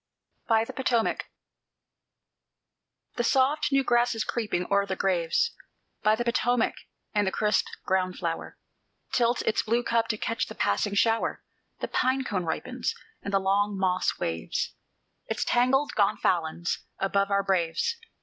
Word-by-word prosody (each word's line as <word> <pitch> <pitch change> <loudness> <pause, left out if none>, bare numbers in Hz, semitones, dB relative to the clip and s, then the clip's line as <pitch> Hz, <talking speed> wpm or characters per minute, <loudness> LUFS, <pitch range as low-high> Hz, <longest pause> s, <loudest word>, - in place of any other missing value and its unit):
BY 225 -1 +4
THE - - -8
POTOMAC 240 -4 0 1.9
The 240 - +1
soft 270 +5 +2
new 275 0 +3
grass 240 -1 +2
is 225 - -1
creeping 210 -7 -2
o'er 200 0 +3
the 190 - -2
graves 185 - +1 0.5
By 215 0 +4
the 240 - -2
Potomac; 245 0 +2 0.4
and 205 -2 +2
the - - +1
crisp 210 0 +1 0.2
ground 185 -1 0
flower 165 -2 -4 0.5
Tilts 240 0 +2
its - - +1
blue 235 +2 +1
cup 230 -1 +1
to 215 - -1
catch 230 +2 -1
the - - -9
passing 200 - 0
shower; 225 +2 +1 0.4
The - - -1
pine 260 +1 +1
cone 190 -8 -2
ripens, 160 - -2 0.3
and 200 - -5
the 195 - +4
long 200 +1 +1
moss 185 -1 +1
waves 80 0 -2 0.5
Its - - -1
tangled 270 +4 +3
gonfalons 175 -4 +1 0.2
above 200 +1 +1
our 200 0 +2
braves. 190 - 0
210 Hz, 145 wpm, -27 LUFS, 190-240 Hz, 1.9 s, BY